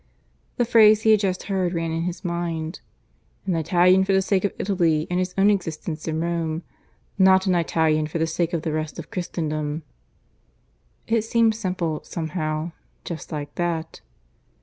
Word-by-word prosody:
The 240 - +2
phrase 215 -2 +6
he 220 - +5
had 215 - +6
just 190 -3 -1
heard 190 -3 -1
ran 165 -1 -1
in 165 0 -1
his 180 +2 -5
mind. 170 -1 -3 0.7
"An 185 -3 0
Italian 180 +3 +4
for 195 +1 +1
the 190 - +4
sake 190 -1 +1
of 200 - +1
Italy 170 -6 +1
and 180 - +1
his 180 0 -2
own 200 +2 +5
existence 165 -4 -3
in 160 0 -1
Rome. 165 -1 -2 0.6
Not 190 0 +6
an 185 - +2
Italian 160 -2 +1
for 160 - -4
the 160 - +1
sake 165 +1 -1
of 165 -2 -1
the 160 - -2
rest 155 -1 -3
of - - -8
Christendom." 155 -3 -3 1.2
It 230 -1 +2
seemed 225 0 +2
simple, 180 -7 -2
somehow, 160 -1 -3 0.3
just 170 0 -6
like 145 -2 -5
that. 165 -2 -2
170 Hz, 170 wpm, -23 LUFS, 160-190 Hz, 1.2 s, phrase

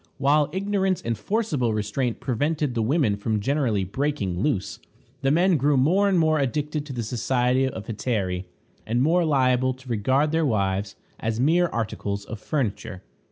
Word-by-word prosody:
While 145 +2 +3
ignorance 190 0 0
and 115 0 -1
forcible 150 - -1
restraint 110 +4 -2
prevented 145 +2 -1
the 115 - -1
women 115 -2 +2
from 105 +1 -1
generally 115 -4 0
breaking 100 -4 -2
loose, 105 -5 -1 0.4
the 135 - +2
men 175 +4 +3
grew 145 +1 +2
more 185 +10 +3
and 190 - +2
more 155 -2 +3
addicted 150 +2 -2
to 135 - -6
the 120 -2 -3
society 125 +3 +1
of 110 -5 -6
hetairæ, 100 -5 -2 0.4
and 120 +3 +1
more 170 +4 +3
liable 130 -4 +2
to 130 0 -15
regard 130 +7 +1
their 165 0 +1
wives 100 -5 0 0.2
as 115 0 -2
mere 170 +7 +3
articles 100 -6 -3
of 110 - -7
furniture. 110 -8 -3
130 Hz, 160 wpm, -24 LUFS, 110-150 Hz, 0.4 s, While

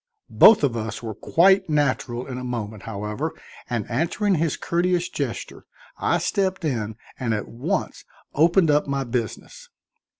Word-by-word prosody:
Both 220 -8 +7
of 130 -5 +2
us 110 0 -4
were 110 -1 -4
quite 190 - +3
natural 130 -5 0
in 130 -2 -6
a - - -6
moment, 110 -4 -4
however, 105 +9 -3 0.4
and 120 -4 -2
answering 170 - 0
his 160 -3 0
courteous 175 +1 0
gesture - - -5 0.3
I - - +2
stepped 190 -3 -1
in 110 -7 -2 0.2
and 115 -4 0
at 105 - -4
once 155 +10 -3 0.3
opened 165 +2 +4
up 145 0 +2
my 140 -1 -1
business. 125 - -5
140 Hz, 145 wpm, -23 LUFS, 115-170 Hz, 0.4 s, Both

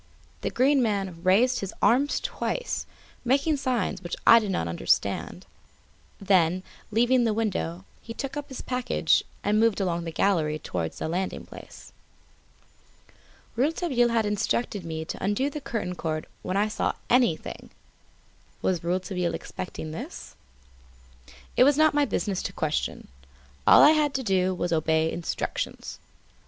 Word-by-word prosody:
The - - -1
Green 270 +2 +3
Man 195 -7 -1
raised 230 +8 +3
his 195 - -5
arms 275 +5 +3
twice, - - -3 0.4
making 280 +5 +2
signs 255 -9 -1
which 175 -2 -4
I 230 - +9
did 215 -3 -4
not 85 - -1
understand; 85 -8 -1 0.7
then, 185 -2 +2 0.3
leaving 240 +3 +3
the 225 -2 +1
window, 95 - -2 0.2
he 230 - -8
again - - -26
took 275 0 -4
up 290 0 -5
his 265 - -7
package 250 -9 +1 0.2
and 210 +1 +2
moved 225 -2 +3
along 175 -3 -1
the 165 - -4
gallery 160 -4 +1
towards 85 - -4
the - - -3
landing 180 +4 -3
place. - - -13 1.6
Rouletabille 265 -2 +1
had 230 -2 +1
instructed 210 0 -1
me 160 -1 -5
to - - -6
undo 205 +9 0
the 300 - -6
curtain 215 -8 -3
cord 155 -3 -3 0.2
when 185 - -2
I 205 +1 +2
saw 215 - -1
anything. 240 -10 +1 0.9
Was 180 -3 0
Rouletabille 180 -1 -1
expecting 160 -3 -6
this? 160 - -8 1.2
It - - +6
was 285 +1 +4
not 310 0 +5
my 290 0 +3
business 195 -4 -2
to - - -5
question. 155 -1 -2 0.6
All - - +9
I 295 - +9
had 300 -2 +2
to 265 - -1
do 185 -3 +1
was 175 -1 -1
obey 160 0 +2
instructions. 170 -1 -4
205 Hz, 145 wpm, -26 LUFS, 170-250 Hz, 1.6 s, I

